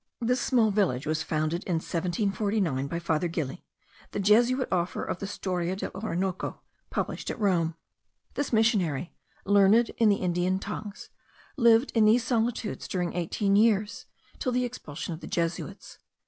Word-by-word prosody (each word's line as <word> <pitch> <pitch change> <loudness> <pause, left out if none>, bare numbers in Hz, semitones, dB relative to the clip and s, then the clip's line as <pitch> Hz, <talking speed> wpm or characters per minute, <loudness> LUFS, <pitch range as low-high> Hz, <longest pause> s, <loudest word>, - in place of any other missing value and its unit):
This 250 +2 +1
small 230 -5 +3
village 175 -11 +1
was 155 0 0
founded 155 +3 -1
in 175 - 0
1749 180 -3 -1
by 170 - -3
Father 170 0 0
Gili, 160 -5 -4 0.5
the - - -2
Jesuit, 240 +6 +4
author 180 -1 -1
of - - -4
the 200 - -4
Storia 185 -3 -2
dell' 190 - -5
Orinoco, 190 -2 -3 0.3
published - - -3
at - - -4
Rome. 170 -6 +1 0.6
This 285 - -2
missionary, 195 - +1 0.3
learned 205 +4 +5
in 225 -2 +5
the 200 - +4
Indian 180 0 0
tongues, 205 +1 -7 0.4
lived 235 -1 +4
in 225 -2 +4
these 225 +3 +5
solitudes 235 -2 -1
during 180 -2 -2
eighteen 195 +3 0
years, 210 -1 +2 0.3
till 255 - -1
the 250 0 +1
expulsion 175 -9 -6
of 160 - -7
the - - -9
Jesuits. 170 -1 -3
195 Hz, 150 wpm, -27 LUFS, 170-220 Hz, 0.6 s, learned